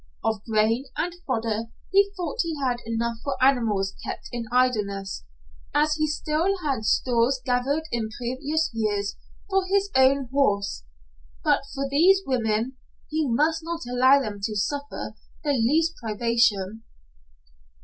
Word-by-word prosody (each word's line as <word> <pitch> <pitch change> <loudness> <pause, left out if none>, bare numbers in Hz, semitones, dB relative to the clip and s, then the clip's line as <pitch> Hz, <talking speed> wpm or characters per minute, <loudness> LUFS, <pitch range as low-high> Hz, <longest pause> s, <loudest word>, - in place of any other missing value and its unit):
Of 220 -2 -1
grain 225 +3 +2
and 350 +1 -1
fodder 225 -3 -1 0.2
he 400 +1 +4
thought 345 -5 -4
he 330 -3 -3
had 250 -3 0
enough 230 0 -1
for 280 - -1
animals 225 -7 +2
kept - - -6
in 240 -1 -4
idleness, 205 - 0 0.5
as 300 +1 +3
he 310 0 0
still 310 +5 0
had 265 -7 -1
stores 245 +3 +2
gathered 265 +5 +1
in 230 -2 -1
previous 280 +6 -1
years 205 -3 -1 0.3
for 385 -1 +2
his 395 +1 +1
own 265 0 +4
horse. 200 - +1 0.6
But - - +2
for 275 0 -1
these 360 +8 +4
women, 235 0 0 0.3
he 310 -3 0
must 315 +7 +2
not 335 0 -4
allow 260 +3 +5
them 210 -6 -4
to 210 +2 -2
suffer 285 +8 -3 0.3
the 295 - +1
least 305 +8 +2
privation. 220 -2 +1
255 Hz, 140 wpm, -25 LUFS, 225-300 Hz, 0.6 s, allow